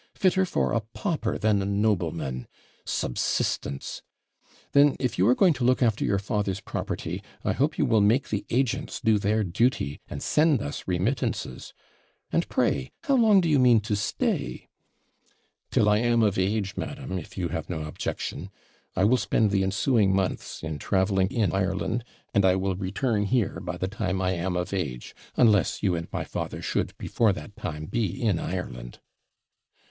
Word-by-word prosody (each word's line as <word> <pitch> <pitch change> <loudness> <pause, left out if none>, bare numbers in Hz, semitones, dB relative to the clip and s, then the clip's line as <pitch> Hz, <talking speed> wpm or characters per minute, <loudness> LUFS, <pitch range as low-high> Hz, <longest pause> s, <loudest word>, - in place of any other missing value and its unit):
fitter 190 0 +2
for - - 0
a 115 - +2
pauper 155 - -1
than 105 -1 +2
a - - -2
nobleman 85 - -1 0.4
subsistence! 70 +2 -2 0.7
Then, 140 0 +5
if 125 -7 -1
you 95 - +4
are 125 - +5
going 180 +1 +5
to 130 -3 -4
look 130 +1 +3
after 110 -3 +1
your 100 - +2
father's 100 -2 -1
property, - - -4 0.2
I - - +2
hope 150 +4 0
you 150 - +2
will 115 -5 +3
make 115 +7 +3
the 105 -2 -1
agents 135 +3 0
do 110 -4 +3
their 105 +2 +1
duty, 95 - 0
and - - -5
send 150 -3 +3
us 70 -7 -5
remittances. 110 - -2 0.6
And - - 0
pray 65 -2 +1
how 275 - +2
long 220 -6 +6
do 170 - 0
you 150 -3 +4
mean 125 -3 +6
to 105 0 -1
stay?' 65 -10 -2 1.0
'Till 105 - +3
I 105 0 +4
am 120 0 +3
of 100 -3 +2
age, 100 +1 0
madam, 135 -10 -4
if 85 - -12
you 90 -2 -1
have 80 0 -4
no 80 -3 -3
objection. 75 +2 -4 0.5
I 95 - +2
will 120 +5 +5
spend 110 -4 +1
the 100 -1 +2
ensuing 100 +1 +2
months 95 -4 -2
in 80 -2 -4
travelling 95 -1 +1
in 105 -6 0
Ireland; 95 +5 -1 0.3
and 100 - +3
I 95 -1 +5
will 95 0 0
return 105 +3 -1
here 120 0 0
by 90 0 -5
the 95 - -2
time 95 -2 -2
I 95 -1 +1
am 90 +1 -2
of 90 +2 -3
age, 70 -11 -3 0.2
unless 105 - +3
you 90 - +3
and 85 -1 -3
my - - -2
father - - -4
should, - - -2
before 115 -3 +2
that 85 +5 -9
time, 75 -3 -5
be 100 0 -2
in 105 -8 +1
Ireland.' - - -5
100 Hz, 175 wpm, -26 LUFS, 90-120 Hz, 1.0 s, long